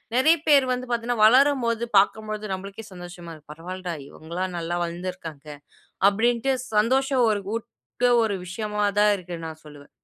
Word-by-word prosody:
நெறைய 315 +7 +5
பேர் 280 -3 +5
வந்து 250 0 -4
பாத்தீங்கன்னா 235 -1 0
வளரும் 265 +3 +5
போது 230 0 0
பாக்கும்பொழுது 215 +1 +1
நம்பளுக்கே 195 +3 -7
சந்தோஷமா 175 -1 -9
இருக் 150 -1 -14
"பரவால்லடா 180 +1 -6
இவுங்கல்லாம் 175 +4 -5
நல்லா 170 +1 -2
வளந்துருக்காங்க." 170 -4 -6 0.6
அப்டின்ட்டு 235 +5 +1 0.2
சந்தோஷம் 260 +3 +3
ஒரு 210 -2 0
ஊட்ற 230 - -5 0.5
ஒரு 205 -3 -1
விஷயமா 210 +2 -3 0.2
தான் 210 0 +5
இருக்கு 175 -2 -8
நான் 155 -1 -10
சொல்லுவேன். 145 -1 -14
205 Hz, 145 wpm, -24 LUFS, 175-235 Hz, 0.6 s, நெறைய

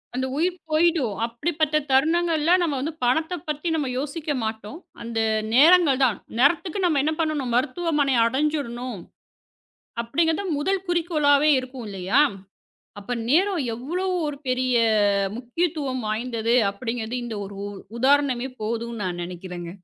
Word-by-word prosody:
அந்த 260 +1 -1
உயிர் 350 +3 +1
போயிடும். 310 -7 +2
அப்படிப்பட்ட 305 +6 -1 0.2
தருணங்கள்ல 325 +3 +2
நம்ம 320 -5 0
வந்து 315 +4 -3
பணத்தை 320 +8 +1
பத்தி 300 +3 -3
நாம 290 -4 -1
யோசிக்க 300 +2 -4
மாட்டோம். 220 +6 -5 0.2
அந்த 230 -1 -3 0.3
நேரங்கள் 300 0 +6
தான். 230 -6 0 0.2
நேரத்துக்கு 330 +7 +2
நம்ம 310 -5 +2
என்ன 310 +2 +1
பண்ணனும்? 300 -6 -1
மருத்துவமனையை 280 0 +1
அடைஞ்சிடணும். 255 - -2 1.0
அப்படிங்கறது 325 +8 0
முதல் 385 +4 -1
குறிக்கோளாவே 305 -4 +3
இருக்கும் 255 -2 -7
இல்லையா? 195 +7 +2 0.8
அப்ப 205 +5 -6 0.2
நேரம் 360 +1 +3
எவ்வளவு 355 +10 -3
ஒரு 295 -1 -4
பெரிய 255 0 +1 0.6
முக்கியத்துவம் 260 0 -2
வாய்ந்தது 230 +1 -1 0.2
அப்படிங்கறது 230 +3 -4
இந்த 235 - -5
ஒரு 200 +1 -9
உ - - -4 0.3
உதாரணமே 265 -1 +2
போதும் 230 +2 -3
நான் 180 -2 -3
நினைக்கிறேங்க. 175 -1 -7
275 Hz, 125 wpm, -24 LUFS, 235-320 Hz, 1.0 s, நேரங்கள்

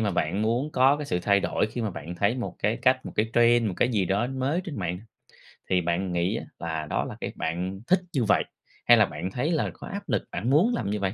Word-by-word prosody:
mà 105 -2 +1
bạn 90 +2 0
muốn 120 +7 0
có 135 +3 +4
cái 150 -1 -5
sự 90 - 0
thay 100 0 +3
đổi, - - 0
khi 115 +3 -5
mà 110 -2 -1
bạn 85 -1 -7
thấy 100 +6 +1
một 120 - -4
cái 105 +2 +1
cách, 130 0 +3
một - - -7
cái 110 +1 +1
trend, 120 0 +4
một 95 - -3
cái - - +2
gì 105 -6 +1
đó 100 +6 +1
mới 135 +6 -1
trên 160 - -6
mạng, 90 -1 -2 0.7
thì 90 -1 +3
bạn 85 +2 -1
nghĩ 90 +4 0
á - - -5 0.2
là 80 -2 -3
đó - - 0
là - - -7
cái - - -3
bạn 90 +4 -3
thích 185 - +4
như 135 -6 +1
vậy 110 - +3 0.4
hay 120 - +7
là 105 - +6
bạn 95 0 -5
thấy 145 - -1
là 160 - +1
có - - -10
áp 200 +1 -7
lực - - +1
bạn 100 +8 -2
muốn 170 - +4
làm 105 - -2
như 105 +1 -1
vậy? 95 -1 -1
105 Hz, 270 wpm, -26 LUFS, 90-130 Hz, 0.7 s, hay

